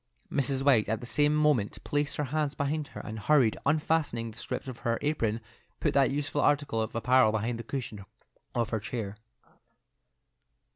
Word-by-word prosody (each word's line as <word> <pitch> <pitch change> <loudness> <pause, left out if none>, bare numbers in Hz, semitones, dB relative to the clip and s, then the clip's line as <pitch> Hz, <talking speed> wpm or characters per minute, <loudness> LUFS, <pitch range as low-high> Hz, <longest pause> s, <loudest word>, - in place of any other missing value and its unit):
Mrs. 135 -1 0
White 120 -7 +4
at 110 0 0
the 120 - -8
same 145 +4 +2
moment 150 -9 +2
placed 145 -1 0
her 150 - 0
hands 150 -2 0
behind 145 +1 -1
her, - - -4
and 110 0 -6
hurriedly 130 -1 +3
unfastening 145 -6 +1
the 110 - -16
strings - - -4
of 130 -3 -7
her 115 0 0
apron, 115 -7 0 0.4
put - - +1
that 135 -2 +4
useful 145 +1 -1
article 145 -6 +2
of 110 - -4
apparel 125 0 +4
beneath 110 +2 -1
the 115 - -6
cushion 115 -5 -5 0.5
of 115 -2 +1
her 110 - 0
chair. 110 -2 -4
130 Hz, 175 wpm, -29 LUFS, 115-145 Hz, 0.5 s, White